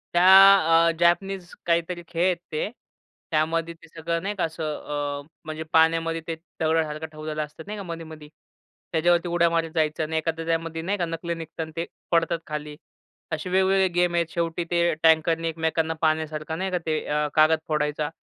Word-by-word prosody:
त्या 185 -2 +7
अ, 165 - +4
जॅपनीज 180 +2 +1 0.2
काहीतरी 170 +1 0
खेळ 175 0 -1
आहेत 185 -2 +2
ते, 155 +5 -2 0.6
त्यामध्ये 165 +2 0
ते 165 0 -18
सगळं 165 +1 -3
नाही 205 +1 -2
का 185 - -1
असं 160 0 -3 0.6
अ, - - -22 0.2
म्हणजे 155 0 -5
पाण्यामध्ये 165 0 +3
ते 165 - -2 0.2
दगडासारखं 160 -1 0
ठेवलेलं 155 0 -4
असतं, 150 +2 -13
नाही 210 0 -5
का 200 - -6
मधी-मधी. 160 -3 -8 0.6
त्याच्यावरती 175 +1 +2
उड्या 170 0 +3
मारीत 165 -1 -1
जायचं 155 0 +1
अन 155 +1 -5
एखादं 165 +1 -1
त्यामध्ये 165 0 -2
नाही 195 +5 -1
का 175 - 0
नकली 165 +1 -4
निघतात, 160 0 -6
ते 165 +1 -2 0.3
पडतात 165 0 +2
खाली. 150 -1 -5 0.6
असे 160 +3 -3
वेगवेगळे 190 +1 +3
गेम 175 -1 +2
आहेत. 170 -1 +1
शेवटी 170 +1 -2
ते 170 -1 +2
टँकरनी 165 +1 +3
एकमेकांना 160 0 -1
पाण्यासारखं, 155 0 -1
नाही 190 +1 -2
का 180 - +1
ते 155 -1 0
अ, 150 0 0
कागद 155 +1 +5
फोडायचा. 150 -1 -1
165 Hz, 170 wpm, -25 LUFS, 160-170 Hz, 0.6 s, त्या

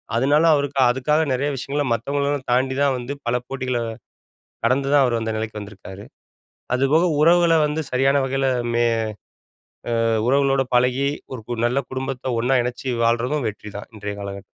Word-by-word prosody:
அதனால 145 +6 +3
அவருக்கு 140 -1 -1
அதுக்காக 150 +6 +1
நெறைய 140 +3 0
விஷயங்கள 140 +3 -2
மத்தவங்களலாம் 140 +3 -2
தாண்டித்தான் 130 +2 +2
வந்து, 125 +3 -5
பல 120 - +1
போட்டிகள 130 -2 -2 0.9
கடந்துதான் 135 +3 +3
அவர் 120 -2 0
அந்த 110 0 -2
நிலைக்கு 110 -1 -4
வந்திருக்காரு. 100 -1 -10 0.7
அது 130 +2 +1
போக 165 +3 +4 0.2
உறவுகள 170 +1 +5
வந்து 150 +1 -2
சரியான 135 +2 +3
வகைல 135 +1 0 0.3
மெ 120 0 +3 1.2
அ - - +2 0.2
உறவுகளோட 135 0 +3
பழகி 125 +2 +2 0.3
ஒரு 125 - -6
கு 120 -2 -3
நல்ல 125 +3 0
குடும்பத்த 130 -1 -3
ஒண்ணா 130 +3 +2
இணைச்சு 125 +2 -4
வாழ்றதும் 120 +4 +1
வெற்றிதான். 105 -1 -8
இன்றைய 105 -1 -5
காலகட்டத்துல. 100 -1 -7
130 Hz, 145 wpm, -22 LUFS, 120-140 Hz, 1.2 s, உறவுகள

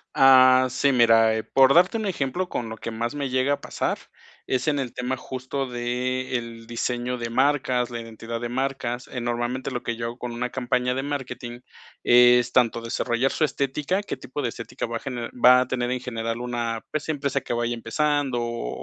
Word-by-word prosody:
Ah, 130 -1 +7
sí, 140 +2 +2
mira, 115 -3 +5
eh, 110 - -3
por 135 0 +4
darte 180 +6 +5
un 220 -2 -2
ejemplo, 175 +1 -2
con 120 - -3
lo 110 0 -7
que - - -6
más 115 +2 -3
me 140 -2 -3
llega 130 +2 +2
a - - -4
pasar, - - -2 0.5
es 130 +4 -1
en 145 -2 +2
el 130 -3 -3
tema 125 +1 -3
justo 130 +1 -4
de 125 +1 -2
el 115 -1 -5
diseño 120 +1 -2
de 115 0 -3
marcas, 130 -1 +1
la 120 -1 -4
identidad 115 0 -7
de 120 - -3
marcas. 130 -1 -2
Eh, 125 - -5
normalmente, 120 +2 -2
lo 125 -2 -4
que 115 - -2
yo 115 0 -3
hago 120 +1 -7
con 125 -2 -5
una 125 +1 -3
campaña 125 0 0
de 135 - -2
marketing 130 -4 -5 0.4
es 120 0 +6
tanto 115 -2 +2
desarrollar 120 +2 0
su 160 - -1
estética, 150 +6 0
qué 205 - -5
tipo 130 +3 -6
de 125 - -1
estética 115 0 -6
va 115 - -3
a - - -8
gener 120 -3 -5
va 125 +1 +6
a 130 - -2
tener 125 -1 -1
en 125 - -1
general 115 -1 -4
una, 120 -2 -3
pues, 155 - -3
una 160 - 0
empresa 140 -1 -1
que - - -4
vaya 120 0 -1
empezando 140 +1 0
o 120 - -3
125 Hz, 210 wpm, -24 LUFS, 120-135 Hz, 0.5 s, Ah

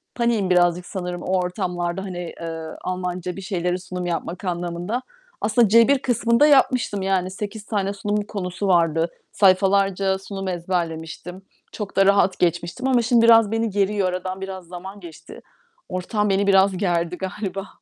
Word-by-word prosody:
paniğim 235 -5 +1
birazcık 175 0 +3
sanırım 180 -2 -5
o 185 0 +1
ortamlarda, 180 0 -2
hani, 175 -3 -6
eee, 165 -1 -5 0.2
Almanca 180 -1 -3
bir 195 - -7
şeyleri 180 -1 -2
sunum 180 0 -6
yapmak 175 +2 -4
anlamında. 175 +6 -3 0.4
Aslında 220 +2 +3
C1 230 +5 +5
kısmında 235 +2 +3
yapmıştım 255 -7 +3
yani, 190 -1 0
8 210 +2 -6
tane 200 -2 -1
sunum 205 +1 -1
konusu 195 -1 -4
vardı. 165 -2 +2 0.2
Sayfalarca 195 0 +3
sunum 195 0 -6
ezberlemiştim, 175 0 -4 0.3
çok 210 -2 -6
da 195 - +5
rahat 200 -1 +3
geçmiştim 175 +8 0
ama 250 -2 +3
şimdi 230 0 +3
biraz 225 -2 +6
beni 225 0 0
geriyor. 200 -1 +1
Aradan 185 +1 -4
biraz 190 -2 -6
zaman 190 +3 -9
geçti, 170 -4 -12 0.5
ortam 210 +3 -1
beni 195 +1 +1
biraz 195 -1 +4
gerdi 175 -2 0
galiba. 195 +1 -5
190 Hz, 150 wpm, -22 LUFS, 180-205 Hz, 0.5 s, biraz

